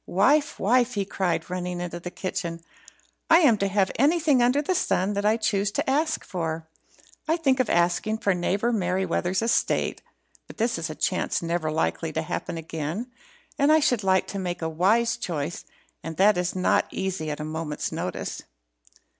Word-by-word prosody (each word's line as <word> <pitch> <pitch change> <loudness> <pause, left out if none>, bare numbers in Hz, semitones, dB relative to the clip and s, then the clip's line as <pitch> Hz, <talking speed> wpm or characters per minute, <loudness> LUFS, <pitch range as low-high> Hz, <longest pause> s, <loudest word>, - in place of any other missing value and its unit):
Wife! 285 +11 +2
wife!" 245 +4 +2
he 200 -1 0
cried, 175 -4 -1
running 180 -1 -4
into 175 -1 -5
the 175 - -6
kitchen, 175 -3 -4 0.7
"I 330 +2 +7
am 270 -9 +6
to 200 - +1
have 195 -1 +1
anything 300 -2 +3
under 250 +4 +3
the 300 +6 0
sun 200 - +1
that 200 0 -2
I 215 +2 +4
choose 205 -2 0
to - - -1
ask 310 +4 0
for. 165 -3 -3 0.6
I 320 +2 +2
think 270 -5 +2
of 255 - +1
asking 175 +5 +1
for 200 -3 +1
neighbour 195 +6 0
Merryweather's 185 0 0
estate, 230 - +1 0.5
but - - -12
this 230 -5 0
is 165 0 -3
a 155 - -6
chance 185 0 -1
never 165 -2 -1
likely 160 +1 -1
to 160 - -1
happen 170 +2 -4
again, 165 - -4 0.5
and 280 +2 +4
I 315 - +6
should 245 -7 +1
like 190 -1 +3
to 200 - -4
make 175 -2 -4
a 160 - 0
wise 210 +9 +2
choice, 160 -1 -4 0.4
and 165 -1 -6
that 205 +2 +5
is 180 0 -1
not 185 - +2
easy 190 -5 -3
at 150 - -4
a 150 - -4
moment's 155 -1 -4
notice." - - -4
190 Hz, 180 wpm, -25 LUFS, 170-235 Hz, 0.7 s, I